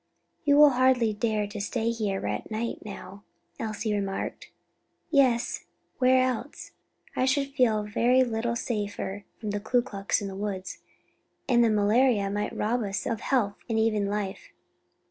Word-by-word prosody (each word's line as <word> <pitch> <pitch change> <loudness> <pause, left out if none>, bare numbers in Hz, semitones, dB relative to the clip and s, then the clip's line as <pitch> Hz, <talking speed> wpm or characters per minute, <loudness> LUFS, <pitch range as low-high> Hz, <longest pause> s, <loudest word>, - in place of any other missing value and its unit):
"You 285 -1 +5
will 295 -1 +8
hardly 250 -3 +3
dare 210 -1 0
stay 225 +3 -1
here 210 -4 -2
at - - -3
night 225 +2 -3
now?" 200 -2 -9 0.4
Elsie 215 -1 -2
remarked. 195 -1 -3 0.6
"Yes; 255 -4 +2 0.3
where 255 0 +5
else? 255 +3 -3 0.4
I 255 - +2
should 275 +1 0
feel 230 -6 +2
very 240 +5 +3
little 235 -1 -1
safer 205 -3 -3
from 215 -2 -3
the 205 - -2
Ku 240 +4 +1
Klux 200 -3 -1
in 205 - -4
the 195 - -6
woods, 195 -2 -4 0.7
and 240 -2 +4
the 230 - +4
malaria 210 0 +3
might 205 +1 -3
rob 235 +3 0
us 200 -2 -3
all 245 - 0
of 225 - -6
health 215 -7 0
and 225 - 0
even 215 -2 +2
life." 200 -1 -4
220 Hz, 155 wpm, -27 LUFS, 205-245 Hz, 0.7 s, will